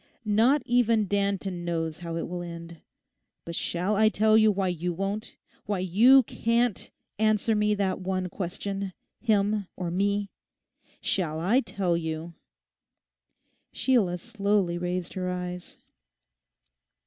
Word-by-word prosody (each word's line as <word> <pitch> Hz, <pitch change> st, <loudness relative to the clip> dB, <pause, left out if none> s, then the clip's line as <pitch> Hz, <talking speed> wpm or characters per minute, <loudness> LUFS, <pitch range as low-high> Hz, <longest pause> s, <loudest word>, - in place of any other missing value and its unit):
Not 235 Hz, +7 st, +3 dB
even 230 Hz, -3 st, +3 dB
Danton 200 Hz, -2 st, -1 dB
knows 165 Hz, -2 st, -2 dB
how 170 Hz, -1 st, -5 dB
it 165 Hz, -, -3 dB
will 175 Hz, 0 st, -5 dB
end. 170 Hz, -1 st, -8 dB, 0.7 s
But 170 Hz, -, -6 dB
shall 180 Hz, +5 st, -1 dB
I 215 Hz, +1 st, +5 dB
tell 215 Hz, 0 st, +3 dB
you 220 Hz, -1 st, +6 dB
why 195 Hz, -2 st, 0 dB
you 175 Hz, 0 st, -2 dB
won't, 195 Hz, +4 st, -4 dB, 0.3 s
why 205 Hz, -1 st, 0 dB
you 220 Hz, +9 st, +6 dB
can't 230 Hz, -2 st, 0 dB, 0.3 s
answer 215 Hz, 0 st, +2 dB
me 210 Hz, 0 st, +2 dB
that 195 Hz, -2 st, -1 dB
one 185 Hz, 0 st, -2 dB
question—him 200 Hz, +3 st, -2 dB
or 180 Hz, -2 st, -4 dB
me? 200 Hz, +2 st, 0 dB, 0.7 s
Shall 160 Hz, -5 st, 0 dB
I 200 Hz, +10 st, +3 dB
tell 195 Hz, -8 st, -1 dB
you?' 160 Hz, 0 st, -4 dB, 1.4 s
Sheila 210 Hz, -9 st, +2 dB
slowly 200 Hz, -4 st, 0 dB
raised 180 Hz, 0 st, -3 dB
her 185 Hz, -1 st, -3 dB
eyes. 180 Hz, 0 st, -5 dB
195 Hz, 125 wpm, -27 LUFS, 175-215 Hz, 1.4 s, you